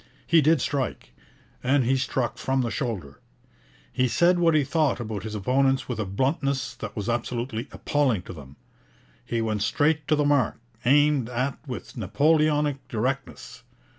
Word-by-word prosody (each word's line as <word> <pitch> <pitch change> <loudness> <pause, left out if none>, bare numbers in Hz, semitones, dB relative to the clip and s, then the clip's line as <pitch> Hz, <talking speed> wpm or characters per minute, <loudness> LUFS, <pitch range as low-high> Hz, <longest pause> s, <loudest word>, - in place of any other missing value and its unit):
He 165 -1 +5
did 155 -1 +3
strike, 135 -2 -3 0.5
and 130 +1 +3
he 130 +3 +2
struck 130 -1 -1
from 135 0 0
the 120 -2 -2
shoulder. 100 - -4 0.7
He 130 0 +2
said 175 +9 +3
what 165 -2 +4
he 150 - +4
thought 145 -2 +1
about 110 -4 -4
his 110 -1 -6
opponents 135 +6 +1
with 120 -4 -4
a 110 - -1
bluntness 135 - -1
that 105 -2 -7
was 105 -2 -4
absolutely 120 +1 -2
appalling 130 -10 0
to - - -9
them. 70 -4 -12 0.7
He 115 -1 -2
went 110 -2 -1
straight 150 +7 +1
to 155 - +3
the 150 -1 +1
mark 145 -5 +2 0.3
aimed 145 -2 +4
at 130 +3 -2
with 125 0 -7
Napoleonic 150 - +1
directness. 130 +5 -4
130 Hz, 160 wpm, -25 LUFS, 115-145 Hz, 0.7 s, He